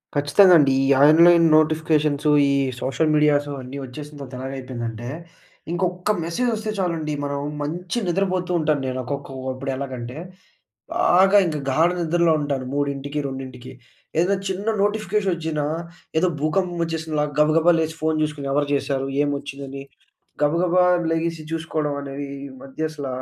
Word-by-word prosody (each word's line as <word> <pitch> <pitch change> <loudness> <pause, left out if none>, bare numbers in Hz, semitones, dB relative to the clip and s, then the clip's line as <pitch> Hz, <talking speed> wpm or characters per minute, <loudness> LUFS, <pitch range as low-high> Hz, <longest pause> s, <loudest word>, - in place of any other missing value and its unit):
ఖచ్చితంగా 180 +7 +5
అండి. 140 -2 +4
ఈ - - +1 0.2
ఆన్‌లైన్ 170 +2 +7
నోటిఫికేషన్సు, 155 -1 +2 0.2
ఈ - - +2 0.3
సోషల్ 155 +4 0
మీడియాస్ 150 -1 +3
అన్నీ 130 +2 -8
వచ్చేసిన 145 +4 -9
తర్వాత 135 -2 -9
ఎలాగ 130 +1 -5
అయిపోయిందంటే, 120 -2 -6 0.6
ఇంకొక్క 180 +2 -1
మెసేజ్ 170 +10 -1
వస్తే 215 0 -4
చాలండి, 165 -5 -1
మనం 140 0 -2 0.2
మంచి 175 +8 -4
నిద్రపోతూ 185 0 0
ఉంటాను 155 -3 +1
నేను 130 0 -3
ఒక్కకొక్కప్పుడు 135 0 -5
ఎలాగంటే, 130 -1 -6 0.8
బాగా 195 +3 +5
ఇంక 155 -2 -2
గాఢ 160 +6 +3
నిద్రలో 170 0 +2
ఉంటాను 140 -3 -2
3కి, 140 0 -2
2కి. 130 -1 -8 0.5
ఏదైనా 185 +4 +3
చిన్న 190 +2 -4 0.2
నోటిఫికేషన్ 205 -1 0
వచ్చినా, 160 -2 -2 0.5
ఏదో 180 +3 +3
భూకంపం 175 +3 0
వచ్చేసినలా 160 -2 -2 0.2
గబగబా 160 +3 +4
లేసి 160 0 -2
ఫోన్ 160 0 +1
చూసుకొని, 150 -2 -3
ఎవరు 145 0 +1
చేశారు, 135 -1 -1 0.2
ఏం 145 - 0
వచ్చిందని, 140 -1 -8 0.6
గబగబా 175 +4 +3 0.3
లెగిసి 165 0 -1
చూసుకోవడం 155 -2 -2
అనేది 140 0 -6 0.2
ఈ - - -8
మధ్య 140 +4 -4
అసల, 145 -3 -6
155 Hz, 135 wpm, -22 LUFS, 140-170 Hz, 0.8 s, ఆన్‌లైన్